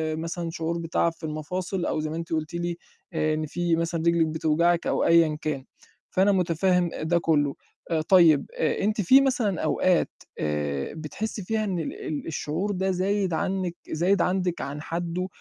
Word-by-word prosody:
مثلًا 165 +1 -4
شعور 165 +1 -2
بتَعَب 170 0 0
في 165 - -24
المفاصل 175 +4 -3
أو 155 - -1
زي 155 0 -2
ما 160 - -4
أنتِ 165 0 -4
قُلتِ 155 +1 -2
لي 170 0 -2 0.4
آآ 155 -1 +1
إن 155 0 -1
في 170 +2 0
مثلًا 165 0 -1
رجلِك 170 -1 +4
بتوجعِك 160 +2 +1
أو - - +1
أيًا 165 -2 +4
كان، 145 -4 -2 0.5
فأنا 195 +2 +3
مُتفهِّم 180 -1 +2
ده 170 +2 +2
كُلّه، 145 -4 +1 0.4
آآ 160 -1 +2
طيب 160 -4 +5
آآ 155 - 0
أنتِ 210 0 +1
في 265 +9 +7
مثلًا 235 -9 +1
أوقات 180 -2 +2 0.3
آآ 75 -2 -2
بتحسّي 185 +7 -5
فيها 220 +3 -1
إن 185 -4 -1
ال 160 - -3
ال 150 0 -4
الشعور 165 +6 -2
ده 190 0 0
زايد 190 0 0
عنِّك 185 0 -1 0.2
زايد 175 +4 +2
عندِك 180 -1 0
عن 145 +2 -5
حدُّه؟ 175 +2 -3
170 Hz, 175 wpm, -26 LUFS, 155-185 Hz, 0.5 s, في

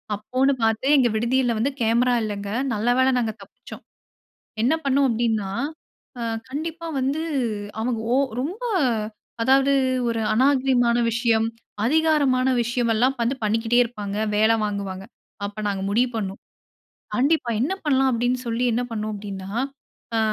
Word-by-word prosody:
அப்போன்னு 255 +6 +1
பார்த்து 225 +2 +1
எங்க 250 -3 +4
விடுதியில 240 +2 +1
வந்து 245 +6 0
கேமரா 235 +2 +3
இல்லங்க. 205 -2 -4 0.2
நல்ல 220 +3 0
வேள 260 0 +4
நாங்க 230 -3 0
தப்பிச்சோம். 200 - -12 0.8
என்ன 245 +6 +3
பண்ணோம் 275 0 +3
அப்டின்னா, 225 -4 0 0.7
அ - - -4 0.3
கண்டிப்பா 325 +4 -5
வந்து 275 +4 0 0.6
அவங்க 235 0 -1 0.2
ஓ - - +3 0.2
ரொம்ப 365 - -5 0.8
அதாது, 270 +3 +4 0.3
ஒரு 230 -1 -1
அநாரிகமான 255 -1 +3
விஷயம், 230 -1 +2 0.4
அதிகாரமான 280 -2 +3
விஷயம் 240 0 0
எல்லாம் 250 +5 +2
வந்து 235 +4 +1
பண்ணிக்கிட்டே 225 +3 +1
இருப்பாங்க. 210 -4 -5 0.2
வேலை 220 +2 +4
வாங்குவாங்க. 200 -2 -3 0.4
அப்ப 205 +1 -6
நாங்க 195 -1 -2
முடிவு 240 +5 +2
பண்ணோம். 195 -3 -3 0.8
கண்டிப்பா 275 -1 +2
என்ன 285 +10 +1
பண்ணலாம்? 270 -3 +3
அப்டினு 245 +2 0
சொல்லி 235 +2 -1
என்ன 240 +2 0
பண்ணோம் 215 -1 -3
அப்டினா 195 -2 -7 0.7
ஆ - - +2
235 Hz, 135 wpm, -23 LUFS, 220-265 Hz, 0.8 s, எங்க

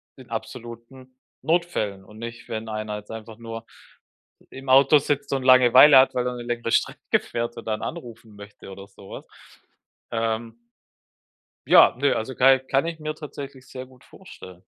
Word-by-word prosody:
in 130 -2 -16
absoluten 120 +2 -9 0.2
Notfällen. 160 - -1
Und 105 +2 -15
nicht, 115 0 -9
wenn 110 0 -6
einer 110 -1 -5
jetzt 105 0 -13
einfach 110 0 -9
nur 115 -1 -9 0.9
im 135 +1 -11
Auto 135 +3 +6
sitzt 140 0 -3
und 135 -1 -2
Langeweile 130 +2 +7
hat, 130 - +3
weil 125 0 -1
er 125 - -3
'ne 120 - -7
längere 120 -1 -4
Strecke - - 0
fährt 120 0 -5
und - - -9
dann 110 0 -2
anrufen 115 -9 -9
möchte 105 -1 -13
oder 95 +1 -11
sowas, 100 -1 -12 0.9
ähm. 115 0 -3 1.1
Ja, - - +6
ne, 140 +1 +1
also, 120 +4 -4
kei 130 +2 +5
kann 135 +3 -1
ich 165 -1 -5
mir 155 0 -5
tatsächlich 140 -3 -10
sehr 130 0 -9
gut 130 0 -21
vorstellen. 95 - -14
120 Hz, 165 wpm, -23 LUFS, 110-135 Hz, 1.1 s, Langeweile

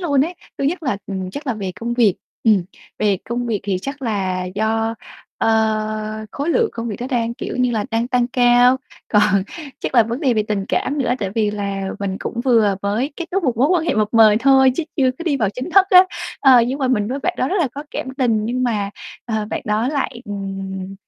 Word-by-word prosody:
luôn 285 -6 +2
ấy. 345 +3 -5 0.2
Thứ 275 - -1
nhất 335 +5 -1
là, 260 -9 0
ừm, 190 -2 -4
chắc 285 +9 -7
là 250 - 0
về 195 -4 -4
công 235 +5 -3
việc. 225 -6 +4 0.3
Ừm, 210 -6 +4 0.3
về 205 -2 +2
công 240 +1 -2
việc 220 -4 -1
thì 195 -2 -1
chắc 275 +1 -6
là 190 -6 -1
do, 220 +4 -1 0.4
ơ, 215 -1 0
khối 285 +3 -4
lượng 455 +6 +2
công 230 0 -4
việc 210 - -4
đó 250 - -3
đang, 235 -2 0
kiểu - - -5
như 250 -1 +2
là, 220 -3 -1
đang 230 +1 0
tăng 245 -1 +1
cao. 245 0 +5 0.3
Còn 210 -2 +3 0.4
chắc - - -4
là 240 - +7
vấn 230 +4 -4
đề 265 -6 +2
về 215 - +2
tình 205 -2 -1
cảm 290 +3 -1
nữa, 250 -3 +1
tại 195 -4 -3
vì 215 -2 +1
là 200 -1 -3 0.2
mình 195 -1 -2
cũng 235 - -4
vừa 225 -6 +3
mới 215 +8 -1
kết 340 - -4
thúc 385 0 -1
một 245 -5 +1
mối 265 +5 +3
quan 350 -2 +2
hệ - - 0
mập 215 -1 +1
mời 220 -2 +7
thôi 265 -1 +5
chứ 335 - -1
chưa 265 -4 +3
có - - -5
đi 305 -5 +1
vào 220 -6 +1
chính 250 - -6
thức 390 +1 +5
á. 365 0 +9 0.4
Ờ, 260 -3 +7
nhưng 260 +3 -2
mà 265 -2 0
mình 210 -5 +1
với 265 +3 -2
bạn 360 +5 -1
đó 255 - 0
rất 390 - 0
là 305 - +1
có 285 +2 -6
cảm - - -4
tình 230 -6 +1
nhưng 250 +3 -1
mà, 210 -5 -1 0.3
ờ, 220 -2 -2
bạn - - -2
đó 215 +3 0
lại, 270 -4 -2
ừm, 195 -2 -5
230 Hz, 240 wpm, -20 LUFS, 210-265 Hz, 0.4 s, á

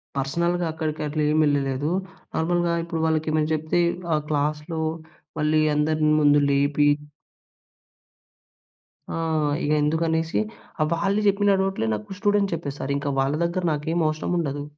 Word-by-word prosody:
పర్సనల్‌గా 170 +6 0
అక్కడికట్ల 155 -1 -3
ఏం 155 - +2
వెళ్ళలేదు. 140 0 0 0.5
నార్మల్‌గా, 175 +1 +1
ఇప్పుడు 165 -1 -3
వాళ్ళకేమెనా 155 -1 +1
చెప్తే 155 +3 0 0.3
,ఆ - - +2
క్లాస్‌లో 150 +2 -1 0.6
మళ్ళీ 155 +1 +2
అందరి 155 +1 +2
ముందు 145 0 +5
లేపి 145 +1 +3 2.3
ఆ! - - -2 0.5
ఇక - - -1
ఎందుకనేసి, 160 +2 0 0.4
ఆహ్, 155 - +3
వాళ్ళు 195 +5 +1
చెప్పిన 200 0 +3
డౌట్లే 190 -12 -1
నాకు 105 - -6
స్టూడెంట్ 205 -2 +2
చెప్పేసారింక. 140 -2 -3
వాళ్ళ 135 +2 0
దగ్గర 175 +2 -2
నాకేం 160 +3 -2
అవసరం 155 +2 -2
ఉండదు. 145 -3 -2
155 Hz, 120 wpm, -24 LUFS, 145-170 Hz, 2.3 s, ముందు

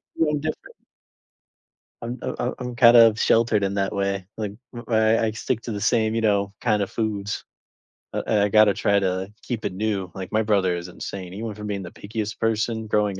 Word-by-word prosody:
feeling 150 -2 +1
different. 155 +1 -5 1.3
I'm 120 +2 -5
uh - - -3
I'm 125 - -1
I'm 125 -1 -5
kind 120 -1 +7
of 115 -1 +7
sheltered 115 -3 +3
in 100 0 0
that 95 -1 0
way. 100 -1 -1
like, 105 -2 -3 0.3
I 115 - +2 0.3
I - - +3
I - - -1
stick 115 +2 -2
to 115 - -6
the 100 -1 -4
same, 110 0 +2
you 115 - +1
know, 100 -2 +1
kind 105 -4 +2
of 100 - -1
foods. 105 -3 -3 0.7
Uh, - - -1
I 105 -2 +3
I 105 - +2
gotta 105 -1 +6
try 100 0 +2
to 95 +1 -2
keep 120 -3 -4
it - - -2
new. 100 -2 -2
Like, 95 -1 -6
my 110 - +2
brother 100 -4 +2
is 85 +1 -5
insane, 90 0 -7
he 105 +4 -6
went 110 -2 -5
from 105 0 -6
being 100 -2 -3
the 90 - -8
pickiest 110 +1 -5
person 110 0 0
growing 105 -2 +1
105 Hz, 215 wpm, -24 LUFS, 100-115 Hz, 1.3 s, kind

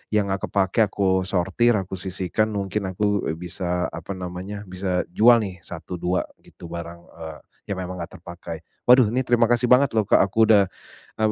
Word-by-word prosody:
yang 100 -2 +1
gak 95 - -2
kepakai 95 +2 +1
aku 95 -1 0
sortir, 95 +6 +2
aku 95 -2 -3
sisihkan, 95 +3 -1
mungkin 100 0 -2
aku, 100 +2 -1
eee, 80 - -2
bisa 90 +1 -3
apa 100 - -6
namanya, 95 +3 -6
bisa 90 -1 -2
jual 115 +4 +5
nih 95 -3 -7
1, 85 +1 -8
2 90 +2 0 0.2
gitu 85 - -14
barang, 85 0 -6 0.2
eee, 80 -1 -8 0.3
yang 100 - -2
memang 90 0 -5
enggak 85 - -8
terpakai. 85 -1 -8 0.3
Waduh, 125 -2 +7
ini 130 - +2
terima 120 -2 +3
kasih 120 +1 +1
banget 130 +1 +5
loh 110 -1 +2
Kak, - - +4
aku 105 +3 +3
udah, 100 -3 +6 0.5
eee, 110 - +3
95 Hz, 185 wpm, -23 LUFS, 90-105 Hz, 0.5 s, Waduh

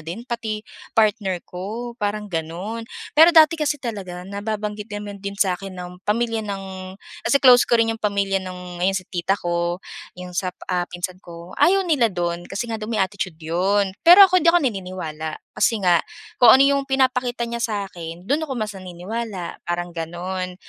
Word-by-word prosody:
din 170 +9 -7
pati 225 -4 -4 0.3
partner 205 -5 +2
ko," 215 +7 -6
parang 210 0 -1
gano'n. 180 +8 -4 0.3
Pero 330 +3 +7
dati 320 0 +7
kasi 295 -1 +1
talaga 195 -8 -6
nababanggit 210 +1 -4
naman 205 -1 -6
din 200 0 -5
sa 185 -3 +1
akin 195 -1 -8
ng 180 0 -7 0.2
pamilya 230 +1 +1
ng 195 -1 -4 0.6
kasi 280 - +5
close 250 -2 +7
ko 240 - +4
rin 225 0 +2
yung 225 - -8
pamilya 200 -2 +1
nung 180 -1 -8
ayon 190 +2 +2
si 185 - -2
tita 180 +2 0
ko, 175 +1 -2 0.3
yung 180 0 -8
sa, 185 +1 -1 0.2
ah, 180 -1 0
pinsan 180 +1 -5
ko. 170 0 -11
Ayaw 390 +2 +5
nila 295 -9 +3
do'n 175 -2 -3
kasi 215 +4 -4
nga 225 - -2
daw 215 - -5
may 220 -3 +1
attitude 190 -3 -3
'yon. 190 +5 +1 0.2
Pero 360 +4 +11
ako 370 -1 +3
hindi 335 - +6
ako 350 - +6
naniniwala 180 - -4 0.2
kasi 225 -4 +1
nga 175 -2 +5 0.4
kung 245 - +9
ano 265 - +7
yung 280 0 +3
pinapakita 255 -2 +1
niya 235 - -3
sa 220 -3 -1 0.2
akin, 170 0 -8
do'n 295 +6 +1
ako 270 - -4
mas 215 -1 -2
naniniwala, 185 +1 -6
parang 175 0 -2
gano'n. 180 +2 -4
200 Hz, 185 wpm, -22 LUFS, 180-230 Hz, 0.6 s, Pero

